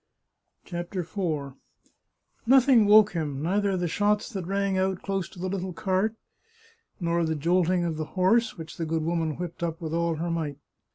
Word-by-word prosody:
CHAPTER 175 Hz, +1 st, -4 dB
IV 160 Hz, -6 st, -3 dB, 0.9 s
Nothing 255 Hz, -4 st, +6 dB
woke 210 Hz, 0 st, +7 dB
him, 150 Hz, -5 st, -3 dB
neither 195 Hz, +2 st, +1 dB
the 175 Hz, -1 st, -1 dB
shots 205 Hz, +5 st, +1 dB
that 190 Hz, -6 st, -5 dB
rang 195 Hz, 0 st, 0 dB
out 190 Hz, -1 st, 0 dB
dose 195 Hz, -3 st, -2 dB
to -, -, -16 dB
the 185 Hz, -, -2 dB
httle 185 Hz, -2 st, -4 dB
cart, 195 Hz, +5 st, 0 dB, 0.8 s
nor 170 Hz, -1 st, +1 dB
the 160 Hz, -1 st, 0 dB
jolting 175 Hz, +3 st, +2 dB
of 165 Hz, -2 st, -2 dB
the 155 Hz, -, -2 dB
horse, 220 Hz, +5 st, +3 dB
which 160 Hz, -1 st, -9 dB
the 165 Hz, -, -2 dB
good 160 Hz, 0 st, -1 dB
woman 165 Hz, -2 st, -1 dB
whipped 175 Hz, -1 st, -6 dB
up 165 Hz, -1 st, -2 dB
with 160 Hz, -1 st, -5 dB
all 170 Hz, 0 st, 0 dB
her 170 Hz, +2 st, -3 dB
might. 155 Hz, -4 st, -3 dB
175 Hz, 175 wpm, -26 LUFS, 165-195 Hz, 0.9 s, woke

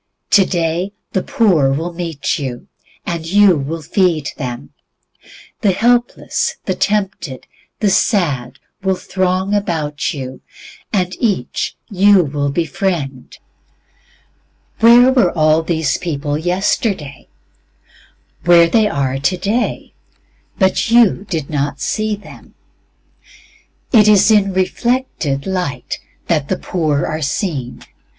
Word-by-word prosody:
Today 180 Hz, -1 st, +1 dB, 0.2 s
the 190 Hz, -, 0 dB
poor 175 Hz, -, +2 dB
will 165 Hz, +5 st, -3 dB
meet 165 Hz, -5 st, -3 dB
you, 130 Hz, -4 st, -6 dB, 0.4 s
and 170 Hz, -2 st, -3 dB
you 195 Hz, +2 st, +4 dB
will 155 Hz, +3 st, -4 dB
feed 165 Hz, -3 st, +1 dB
them. 125 Hz, -3 st, -6 dB, 0.9 s
The 200 Hz, -3 st, +2 dB
helpless, 240 Hz, +4 st, 0 dB
the -, -, 0 dB
tempted, 195 Hz, -10 st, -2 dB, 0.4 s
the 210 Hz, -, +3 dB
sad, 145 Hz, -, 0 dB, 0.2 s
will 190 Hz, 0 st, +1 dB
throng 185 Hz, +1 st, -1 dB
about 160 Hz, -8 st, -1 dB
you, 130 Hz, -3 st, -7 dB, 0.5 s
and 185 Hz, -3 st, -1 dB
each 200 Hz, -, -1 dB
you 200 Hz, -1 st, +4 dB
will 145 Hz, -1 st, -2 dB
befriend. 150 Hz, -3 st, -3 dB, 1.4 s
Where 240 Hz, +3 st, +7 dB
were 225 Hz, -9 st, +3 dB
all 155 Hz, +1 st, +4 dB
these 160 Hz, -4 st, -1 dB
people 145 Hz, -4 st, -3 dB
yesterday? 180 Hz, -, -1 dB, 1.2 s
Where 170 Hz, -1 st, +6 dB
they 215 Hz, +4 st, +3 dB
are 135 Hz, -6 st, -1 dB
today, 190 Hz, -, -1 dB, 0.6 s
but 190 Hz, +1 st, +1 dB
you 230 Hz, -4 st, +4 dB
did 160 Hz, -6 st, -2 dB
not 145 Hz, -2 st, -2 dB
see 215 Hz, -1 st, -1 dB
them. 205 Hz, -, -15 dB, 1.4 s
It 215 Hz, -4 st, +6 dB
is 210 Hz, +1 st, +5 dB
in 200 Hz, -2 st, +3 dB
reflected 185 Hz, -, -1 dB
light 180 Hz, -10 st, -3 dB, 0.3 s
that 155 Hz, -5 st, 0 dB
the 185 Hz, -, -1 dB
poor 155 Hz, -5 st, -1 dB
are 155 Hz, +1 st, -3 dB
seen. 140 Hz, -, -3 dB
175 Hz, 110 wpm, -17 LUFS, 145-200 Hz, 1.4 s, Where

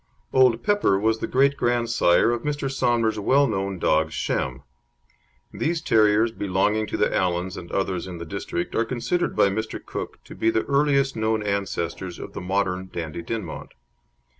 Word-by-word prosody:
Old 130 Hz, -3 st, +4 dB
Pepper 205 Hz, -, +3 dB
was 110 Hz, +2 st, +1 dB
the -, -, -2 dB
great 140 Hz, +2 st, +3 dB
grandsire 120 Hz, -6 st, +2 dB
of 120 Hz, -1 st, -1 dB
Mr. 145 Hz, -1 st, -2 dB
Somner's 120 Hz, -4 st, +1 dB
well 135 Hz, +7 st, +4 dB
known 95 Hz, -5 st, -2 dB
dog 80 Hz, -1 st, +2 dB
Shem. 65 Hz, -3 st, -2 dB, 0.9 s
These 165 Hz, +1 st, -1 dB
terriers 110 Hz, -1 st, +4 dB
belonging 105 Hz, +1 st, 0 dB
to -, -, -3 dB
the -, -, +2 dB
Allans 90 Hz, +1 st, 0 dB
and 85 Hz, -, -9 dB
others 95 Hz, -2 st, -1 dB
in 90 Hz, -2 st, -7 dB
the 85 Hz, -, -7 dB
district 85 Hz, -1 st, -4 dB
are 115 Hz, -, +2 dB
considered 125 Hz, +9 st, -1 dB
by 100 Hz, -, +4 dB
Mr. 110 Hz, +3 st, -3 dB
Cook -, -, -6 dB
to -, -, -11 dB
be 110 Hz, -, +1 dB
the 110 Hz, 0 st, +1 dB
earliest 140 Hz, -1 st, +2 dB
known 110 Hz, -1 st, 0 dB
ancestors 95 Hz, -3 st, -3 dB
of -, -, -8 dB
the -, -, -6 dB
modern 95 Hz, 0 st, -1 dB
Dandie 85 Hz, -1 st, -5 dB
Dinmont. 100 Hz, -3 st, -6 dB
110 Hz, 165 wpm, -24 LUFS, 95-120 Hz, 0.9 s, Old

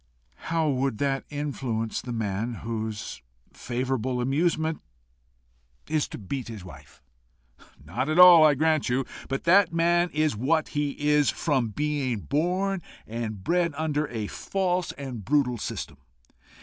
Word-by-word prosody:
"How 165 Hz, -1 st, +1 dB
would 135 Hz, -4 st, 0 dB
that 135 Hz, +1 st, -1 dB
influence 130 Hz, -6 st, -3 dB
the 125 Hz, -, -7 dB
man 115 Hz, +1 st, -2 dB
whose 110 Hz, -2 st, -4 dB, 0.3 s
favourite 125 Hz, -1 st, -2 dB, 0.2 s
amusement 160 Hz, +4 st, 0 dB, 1.1 s
is 155 Hz, -1 st, 0 dB
to -, -, -8 dB
beat 120 Hz, +5 st, -5 dB
his 110 Hz, -5 st, -8 dB
wife!" 90 Hz, -, -14 dB, 0.8 s
"Not 90 Hz, -, -2 dB
at 155 Hz, -, 0 dB
all, 180 Hz, -3 st, +10 dB
I 150 Hz, -2 st, +6 dB
grant 155 Hz, -1 st, +2 dB
you. 130 Hz, +2 st, +1 dB, 0.2 s
But 135 Hz, 0 st, -2 dB
that 185 Hz, +1 st, +5 dB
man 170 Hz, +1 st, +2 dB
is 155 Hz, -4 st, 0 dB
what 155 Hz, +8 st, +1 dB
he 145 Hz, -1 st, -1 dB
is 150 Hz, 0 st, +3 dB
from 135 Hz, -7 st, 0 dB
being 135 Hz, -2 st, -2 dB
born 180 Hz, -, 0 dB, 0.2 s
and 110 Hz, -3 st, -5 dB
bred 170 Hz, -, +1 dB
under 155 Hz, -1 st, 0 dB
a 110 Hz, -3 st, -3 dB
false 180 Hz, -, -1 dB
and 130 Hz, -6 st, -7 dB
brutal 130 Hz, -1 st, +1 dB
system. -, -, -5 dB
140 Hz, 135 wpm, -26 LUFS, 120-160 Hz, 1.1 s, all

